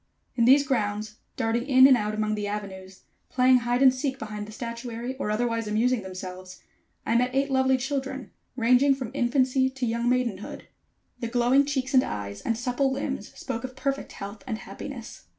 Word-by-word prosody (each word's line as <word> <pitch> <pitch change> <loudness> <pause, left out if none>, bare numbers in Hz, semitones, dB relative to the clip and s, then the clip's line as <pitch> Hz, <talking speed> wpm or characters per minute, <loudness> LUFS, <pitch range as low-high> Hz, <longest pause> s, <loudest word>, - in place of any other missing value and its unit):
In 235 - +3
these 275 +3 +6
grounds, 215 -4 -2 0.2
darting 235 +1 0
in 260 -2 +7
and 270 -1 +8
out 210 -2 -1
among 215 0 0
the 210 -1 -2
avenues, 190 -2 -7 0.3
playing 255 0 +5
hide 245 +2 +1
and 260 -1 +7
seek 265 0 -2
behind 210 -3 -6
the - - -10
statuary, 235 +2 -5
or 210 - -3
otherwise 230 0 -1
amusing 230 +3 +1
themselves, 185 -1 -8 0.5
I 230 - +1
met 250 +2 +2
eight 275 +1 +1
lovely 265 0 +3
children, 270 -3 -4 0.2
ranging 255 +3 +4
from 255 -4 -6
infancy 260 0 +2
to 265 -1 -4
young 235 +1 0
maidenhood. 240 -6 -2 0.5
The 235 - -3
glowing 245 +4 +3
cheeks 265 -2 -2
and 260 - +7
eyes, 100 -1 -5
and 230 - -1
supple 250 +3 0
limbs 265 -5 -3
spoke 230 - -4
of 260 0 -6
perfect 275 +1 -3
health 200 +4 -8
and 225 -3 -2
happiness. - - -9
245 Hz, 180 wpm, -26 LUFS, 215-265 Hz, 0.5 s, and